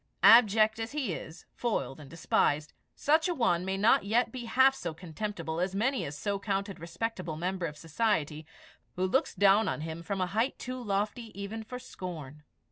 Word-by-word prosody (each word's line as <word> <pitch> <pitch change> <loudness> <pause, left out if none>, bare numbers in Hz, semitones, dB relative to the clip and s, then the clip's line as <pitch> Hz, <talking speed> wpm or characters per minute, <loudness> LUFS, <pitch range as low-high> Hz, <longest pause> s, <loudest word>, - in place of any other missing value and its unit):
Abject 220 -1 +7
as 225 +4 -4
he 265 - -1
is, 160 +1 -9
foiled 160 - -2
and 145 -3 -11
despised, 150 -2 +1 0.2
such 315 +4 +2
a 350 - 0
one 205 - +2
may 190 +1 -2
not 225 +7 +4
yet 225 +5 +1
be 250 -2 -6
half 260 +4 +5
so 170 -11 -5
contemptible 170 0 -5
as 185 +2 -1
many 255 +6 +1
a 140 - -5
so 200 +7 -3
counted 200 -1 -2
respectable 170 0 -4
member 180 +1 -2
of 150 -1 -9
society, 160 -4 -1 0.5
who 185 - 0
looks 260 +9 +1
down 200 +2 +5
on - - -2
him 160 +1 -5
from 195 +4 -3
a 185 - +2
height 220 +8 0
too 255 0 -5
lofty 210 +2 -1
even 215 +3 -5
for 250 +3 -7
scorn. 155 - -8
200 Hz, 185 wpm, -30 LUFS, 165-225 Hz, 0.5 s, Abject